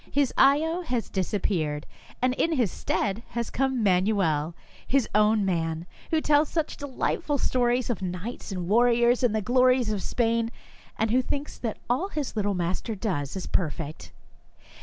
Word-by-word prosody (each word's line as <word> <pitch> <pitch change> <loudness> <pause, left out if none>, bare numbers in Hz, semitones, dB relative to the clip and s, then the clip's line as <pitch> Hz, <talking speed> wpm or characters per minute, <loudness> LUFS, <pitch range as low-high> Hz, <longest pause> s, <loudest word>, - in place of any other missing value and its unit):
His 280 -2 +1
ayo 320 +5 +4
has 245 - -2
disappeared, 175 -6 -1 0.4
and 255 0 +3
in 325 +5 +1
his 245 - +1
stead 200 +2 -1
has 235 -1 -4
come 265 -2 0
Manuel, 180 -5 +2 0.3
his 270 -4 +2
own 210 0 +4
man, 165 -2 -1 0.2
who 320 - +2
tells 295 0 +3
such 320 -2 -1
delight 285 -3 -2
ful 290 -1 0
stories 245 -1 +1
of 215 - -4
knights 185 +6 -5
and 180 -2 -3
warriors 240 +3 +4
and 240 -4 +2
the 215 - 0
glories 250 -1 +3
of 205 -2 -1
Spain, 230 0 0 0.5
and 220 0 0
who 255 +2 +4
thinks 285 +3 -4
that 225 -3 -3
all 255 +11 +1
his 300 -10 -4
little 205 -2 0
master 180 +6 -2
does 180 - -2
is 190 - -4
perfect. 160 -3 -3
225 Hz, 160 wpm, -26 LUFS, 190-255 Hz, 0.5 s, ayo